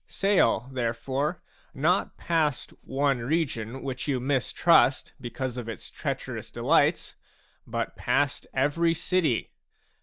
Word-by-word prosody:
Sail, 195 - +2
therefore, 130 +6 -2 0.3
not 165 +7 +1
past 155 -5 0
one 135 -1 0
region 130 -3 -2
wluch 130 -1 -4
you 135 -3 +1
mistrust 135 +3 +3
because 125 +1 -4
of 120 -2 -5
its 110 - -8
treacherous - - -4
delights, - - +2 0.5
but - - -3
past - - 0
every 165 +5 +2
city. 165 -7 0
135 Hz, 110 wpm, -27 LUFS, 125-160 Hz, 0.5 s, mistrust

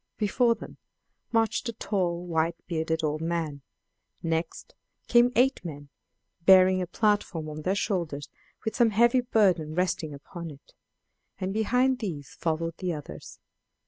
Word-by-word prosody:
Before 230 +3 +2
them - - -11 0.5
marched 225 +1 +1
a - - -4
tall 180 -5 -1
white 165 -1 0
bearded 160 -1 -1
old 155 0 -1
man; 160 -4 -2 0.6
next 165 0 -3 0.3
came 240 +1 +5
eight 260 -1 +3
men, 145 -4 -8 0.5
bearing 185 0 +6
a 180 - -2
platform 200 -5 0
on 155 0 -6
their 185 +5 0
shoulders 170 -8 -2 0.4
with 220 - -2
some 240 -3 +4
heavy 235 +4 +4
burden 185 -10 +2
resting 180 -3 0
upon 165 +4 -8
it; 145 -2 -15 0.7
and 190 0 -2
behind 250 +4 +2
these 165 - -5
followed 165 0 -2
the 185 -2 -2
others. 145 - -8
175 Hz, 140 wpm, -27 LUFS, 160-215 Hz, 0.7 s, bearing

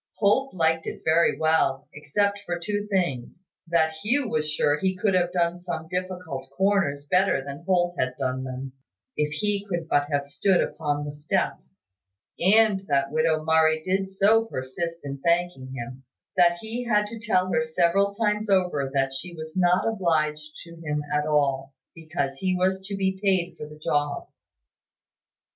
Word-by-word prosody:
Holt 220 +4 +2
liked 160 -1 +1
it - - -6
very 165 +1 +3
well, 155 -4 +1
except 200 +8 0
for 175 0 -1
two 205 +3 -3
things: 175 - -2 0.2
that 165 -1 +2
Hugh 255 - +1
was 155 -6 -1
sure 145 -1 +1
he 190 +2 0
could 195 +1 +1
have 175 -1 +2
done 175 -1 0
some 170 -3 -5
difficult 180 -7 -4
corners 190 -8 +1
better 180 -2 +2
than 140 +3 -7
Holt 175 -2 +1
had 130 0 0
done 130 -1 -2
them, 130 0 -6 0.4
if 150 0 0
he 200 +6 -1
could 170 -3 -2
but 145 -2 +2
have 140 0 0
stood 185 +6 +2
upon 145 -2 -1
the 145 - -4
steps; 165 +5 -3 0.6
and 195 +1 +4
that 140 -1 +1
widow 155 0 +1
Murray 160 0 +3
did 190 +1 0
so 210 +4 +3
persist 165 +1 -5
in 140 0 -5
thanking 170 -4 0
him, 125 +1 -7 0.3
that 175 -1 +4
he 230 +3 -4
had 210 -3 +2
to 225 +2 -8
tell 185 -5 +1
her 160 - +3
several 170 +5 +1
times 210 0 0
over 180 -8 +2
that 135 0 +1
she 170 +6 -6
was 160 +1 -8
not 180 +1 +3
obliged 155 -7 0
to 170 -1 -13
him 150 -1 -2
at 150 0 +1
all, 135 -2 0 0.2
because 145 -4 -3
he 185 +4 0
was 190 +1 +1
to 200 - -3
be 190 -1 -1
paid 180 -3 +1
for 150 - -8
the 150 - -12
job. 145 -1 -1
170 Hz, 170 wpm, -25 LUFS, 145-190 Hz, 0.6 s, and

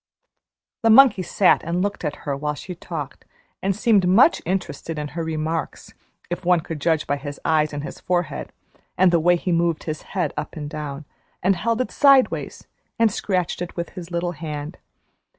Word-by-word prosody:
The 225 - +3
monkey 225 -4 +7
sat 185 +1 +3
and 175 +2 -1
looked 205 -2 -3
at 150 -2 -2
her 140 -2 -1
while 150 +1 -2
she 180 - -7
talked, 160 -5 -7 0.4
and 195 0 0
seemed 210 -4 +3
much 225 - +5
interested 180 -3 -3
in 150 -1 -4
her 165 +2 -4
remarks, 160 0 -3 0.4
if 175 +2 -3
one 175 -1 +3
could 155 -1 -7
judge 160 0 +1
by 145 - -1
his 145 0 -7
eyes 155 -1 +2
and 145 -1 -5
his - - -7
forehead, 175 -2 -2 0.5
and 185 0 +5
the 170 - +4
way 175 +2 +4
he 175 +1 -2
moved 170 -1 +1
his 155 -1 -4 0.2
head 170 -6 0
up 150 0 -5
and 150 -2 -6
down, 150 -1 -6 0.4
and 190 +2 +3
held 230 +6 0
it 255 - -3
sideways 275 -3 +3 0.3
and 230 -2 +4
scratched 185 -3 -1
it 175 - -5
with 170 -1 -4
his 180 -3 -9
little 175 0 -2
hand. 155 0 -6
170 Hz, 185 wpm, -22 LUFS, 155-185 Hz, 0.5 s, monkey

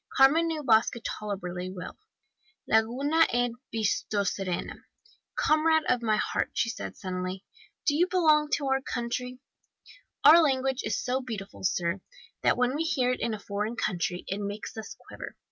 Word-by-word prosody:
Carmen 300 +5 +6
knew 315 -2 -3
Basque 225 -3 +4
tolerably 185 -3 -4
well. 185 -1 -7 0.7
"'Laguna 270 +9 +3
ene 245 0 +1 0.2
bihotsarena, 200 -4 -1 0.6
comrade 315 +1 +3
of 250 -1 +2
my 215 -2 +2
heart,' - - -2
said 230 -1 -2
she - - -23
suddenly. 185 0 -4 0.4
'Do 290 - +3
you 350 +4 +3
belong 310 -5 +3
to 285 - +1
our 270 0 +1
country?' 250 0 -4 0.8
"Our 335 +2 +9
language 265 -3 +1
is - - -1
so 255 +1 -1
beautiful, 220 -6 -7
sir, 180 0 0 0.4
that - - +3
when 250 +1 +2
we 300 - -1
hear 260 -6 +1
it 255 - -2
in 230 -2 -1
a - - -9
foreign 210 +3 -3
country 180 -5 -2
it 195 - -3
makes 205 +1 -5
us 220 -1 -7
quiver. - - -8
235 Hz, 155 wpm, -28 LUFS, 200-275 Hz, 0.8 s, Our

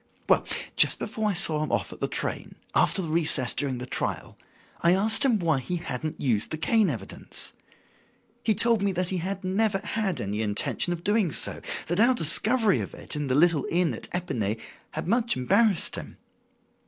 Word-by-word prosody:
Well, - - +4 0.3
just - - +6
before 220 -1 -2
I - - 0
saw 165 -5 +2
him 155 - -3
off - - -1
at - - -14
the - - -1
train, - - -4 0.2
after 190 - +3
the 160 - -4
recess 155 -6 +2
during 135 -3 -1
the 125 - -6
trial, - - -3 0.5
I 170 +2 +4
asked 220 +6 +3
him 255 -5 +3
why 165 -7 +1
he 175 +7 -4
hadn't 155 -2 -5
used 115 -6 0
the 155 - -4
cane 215 +4 +2
evidence. 110 -9 -6 0.9
He 220 - +2
told 230 +1 +4
me 200 -2 0
he 185 +1 -1
had 190 +3 -4
never 195 +2 +1
had 200 - -2
any 105 0 -3
intention 105 +10 -1
of 170 -1 -4
doing 205 -4 +1
so; - - -1 0.2
that 175 +3 -2
our 245 +3 +5
discovery 215 +4 +3
of - - -6
it - - -8
in 150 -1 -3
the 130 - 0
little 160 -2 +3
inn 170 -5 +1
at 115 - -7
Epinay 115 - -2 0.3
had 155 - -6
much 235 +3 +1
embarrassed 200 - +2
him. - - -9
175 Hz, 190 wpm, -26 LUFS, 145-210 Hz, 0.9 s, just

